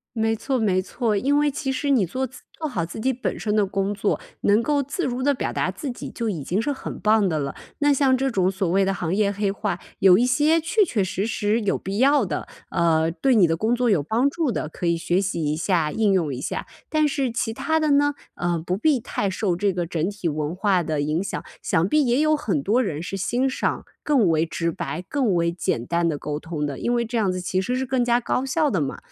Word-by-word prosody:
没 225 0 +1
错 265 +4 -1
没 195 -5 +2
错， 225 +2 -1
因 275 +8 +2
为 295 0 +2
其 270 0 -3
实 280 +2 -1
你 235 -9 +4
做 255 +10 -2
自 255 0 -12
做 315 - -5
好 180 - -2
自 175 +6 -8
己 260 +4 +1
本 255 - -3
身 210 -1 -1
的 210 - +3
工 195 +1 -1
作， 205 0 0 0.2
能 210 +3 +4
够 290 +3 +1
自 285 +5 -3
如 250 0 -2
地 285 +2 +3
表 - - -3
达 - - 0
自 290 - -6
己 245 - -7
就 230 -2 -3
已 160 -8 -3
经 190 +9 0
是 290 +4 -1
很 - - -7
棒 215 -3 +3
的 155 - -1
了。 140 -1 -3 0.2
那 290 0 +3
像 265 -2 +3
这 270 +1 0
种 190 -5 +1
所 190 -1 -2
谓 195 +3 +3
的 195 0 +1
行 175 -2 -2
业 200 -1 +2
黑 205 0 -1
话， 195 -3 -3 0.2
有 185 -1 +7
一 240 - +3
些 300 +5 +3
确 345 +7 +2
确 235 - 0
实 195 +1 -2
实 220 0 0
有 200 - 0
必 195 +3 -4
要 275 -2 +4
的， 155 -6 -4 0.2
呃， 165 -1 +2
对 260 +8 +1
你 200 - +6
的 165 - +1
工 220 +7 +1
作 245 0 +1
有 190 -8 +3
帮 235 - +2
助 315 -3 -1
的， 155 - -2
可 170 +2 -4
以 170 - +2
学 175 +3 +1
习 180 -5 -2
一 150 +1 0
下、 165 -2 +1
应 215 +1 +2
用 165 -7 +1
一 125 - -5
下。 - - -3 0.2
但 310 -1 +2
是 275 -4 -1
其 225 -1 -2
它 320 +7 0
的 310 -1 +1
呢， 290 0 +3 0.2
呃， 175 -1 -1
不 180 - 0
必 270 +5 +2
太 205 -3 -2
受 185 -2 -1
这 200 +2 +1
个 175 -2 -2
整 165 +1 -1
体 205 -3 -4
文 155 0 -2
化 195 -2 +2
的 155 -2 -2
影 155 +5 0
响， - - -4 0.2
想 170 0 +1
必 300 +4 +3
也 245 +2 +2
有 310 0 +3
很 200 - -1
多 230 - +2
人 160 -8 -3
是 175 +3 -5
欣 245 +7 0
赏 - - -2 0.2
更 270 -9 +3
为 160 -1 +2
直 170 0 -2
白、 175 - -4
更 255 -7 +1
为 170 0 +2
简 145 -8 -2
单 170 0 +1
的 150 - -2
沟 150 0 -4
通 155 -2 -4
的， 140 -2 -4
因 240 - 0
为 235 -1 +1
这 230 +1 -3
样 200 -4 +2
子 185 - -3
其 185 +1 -1
实 250 +6 -1
是 265 - -1
更 255 -1 +1
加 240 0 +3
高 250 +1 -1
效 300 +3 +1
的 190 - 0
嘛， 135 -1 -3
205 Hz, 280 characters per minute, -23 LUFS, 175-260 Hz, 0.2 s, 有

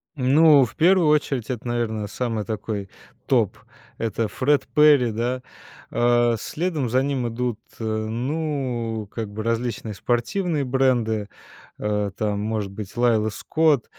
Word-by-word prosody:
Ну, 140 +1 +5
в 115 - -11
первую 175 0 +4
очередь 140 -5 +1
это, 125 -1 -4
наверное, 110 -3 -1
самый 115 -1 -2
такой 105 -2 -4 0.4
топ. - - +2 0.4
Это 115 0 -1
Fred 130 +7 +1
Perry, 145 -6 +6
да. 125 +3 -2 0.5
А 120 0 +3
следом 155 - -2
за 130 +3 +2
ним 135 -3 -1
идут 120 -1 -2 0.2
ы - - -5
ну, 120 0 -2
как 110 -3 -4
бы 105 +2 -6
различные 115 -1 -2
спортивные 140 - -1
бренды, 120 -5 +1 0.5
э, 105 -1 -1
там, 105 -1 -1
может 105 -2 -2
быть, 100 0 -8
Laila 115 -3 +3
Scott. 150 +3 +1
120 Hz, 135 wpm, -23 LUFS, 110-135 Hz, 0.5 s, Perry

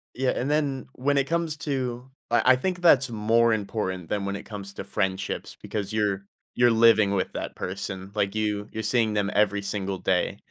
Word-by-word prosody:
Yeah, 130 0 +1
and 135 - -2
then 145 -3 0
when 140 +2 0
it 135 0 +2
comes 165 -2 -1
to 130 -3 -3 0.2
I 120 +2 +4
I - - +4
think 180 +7 -2
that's 135 -7 +5
more 115 +1 +3
important 100 -4 -2
than 100 -1 -1
when 100 0 -2
it 100 - -7
comes 100 -2 -7
to - - -5
friendships 100 -1 -3
because 105 -1 -4
you're 100 -2 0 0.3
you're 120 0 +5
living 110 -3 +5
with 95 -2 0
that - - -5
person. 95 +1 -5
Like, 100 -1 -1
you 105 -1 -1
you're 110 0 -4
seeing 110 -1 +2
them 100 0 0
every 105 -1 +2
single 100 -1 -3
day. - - 0
110 Hz, 195 wpm, -26 LUFS, 100-125 Hz, 0.3 s, that's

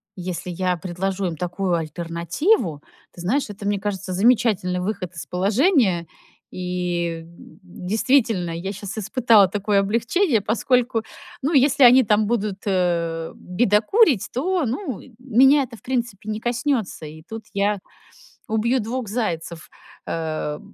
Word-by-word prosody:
если 180 -1 -5
я 180 0 -1
предложу 190 +3 -3
им 170 - -4
такую 180 +1 -1
альтернативу, 170 - -1 0.3
ты 175 - -11
знаешь, 235 +9 0
это, 200 0 -6
мне 205 -1 0
кажется, 195 -2 -4
замечательный 200 -3 +2
выход 185 -1 -3
из 160 -4 -6
положения, 195 - +2 0.4
и, 180 -2 -2
м, 170 +1 -16
действительно, 210 +2 0
я 170 +4 -4
щас 200 +1 -7
испытала 220 -1 +4
такое 205 +1 +1
облегчение, 230 - +1
поскольку, 235 +2 +1 0.4
ну, 295 +5 0
если 275 0 +4
они 250 +1 +8
там 210 0 +2
будут, 210 -4 -1
э, 170 -3 0
бедокурить, 215 - +2
то, 345 +4 0
ну, 255 - -3 0.2
меня 265 +3 +4
это, 245 -3 -9
в - - -20
принципе, 235 -5 -3
не 215 0 -2
коснётся. 240 - -2
И 155 +1 -10
тут 225 0 -7
я 200 +1 +1 0.7
убью 230 +4 +1
2 235 +2 -4
зайцев. 170 -7 -3 0.4
Э, 155 -2 -3
205 Hz, 135 wpm, -22 LUFS, 180-240 Hz, 0.7 s, они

